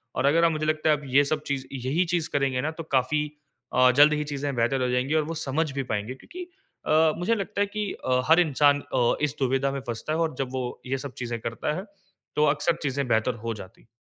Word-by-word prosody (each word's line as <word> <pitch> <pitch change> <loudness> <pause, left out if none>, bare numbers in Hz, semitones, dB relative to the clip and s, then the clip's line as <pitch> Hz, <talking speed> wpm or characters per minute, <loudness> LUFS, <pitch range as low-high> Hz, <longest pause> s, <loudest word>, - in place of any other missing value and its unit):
और 130 - 0
अगर 160 +4 +4
आप, 165 - +4
मुझे 155 -1 -2
लगता 155 0 +1
है, 155 - +6
आप 145 - -12
ये 135 +2 +4
सब 150 +1 -1
चीज़ 135 -2 -2
यही 135 +7 0
चीज़ 170 -3 0
करेंगे 135 -3 +1
ना, 155 - -1
तो 165 +1 -7
काफ़ी 130 +3 +2 0.5
अ, 125 0 +6
जल्द 150 +1 +8
ही 150 0 0
चीज़ें 145 -1 -3
बेहतर 120 +3 +1
हो 125 - 0
जाएँगी 125 +4 0
और 155 - +3
वो - - -4
समझ 150 +3 0
भी 135 0 -2
पाएँगे 105 +4 -2
क्योंकि 360 - -9 0.4
अ, 155 0 +4
मुझे 190 +7 +1
लगता 200 0 -3
है 205 - +2
कि 210 0 -3
अ, 125 0 +2
हर 165 +2 +7
इंसान 145 -2 +3
अ, 120 -2 +3
इस 150 -1 0
दुविधा 135 +1 +1
में 135 0 -4
फँसता 120 +6 -3
है 160 - -1
और 160 -4 0
जब 135 -2 -2
वो 125 -2 -4
ये 135 - -1
सब 130 - -13
चीज़ें 120 -1 -3
करता 115 +6 -2
है, 185 - -4 0.5
तो 150 - +4
अक्सर 170 +2 +2
चीज़ें 140 -1 -1
बेहतर 115 +2 +2
हो 115 - -1
जाती 95 -3 -12
हैं। - - -25
140 Hz, 250 wpm, -26 LUFS, 130-155 Hz, 0.5 s, जल्द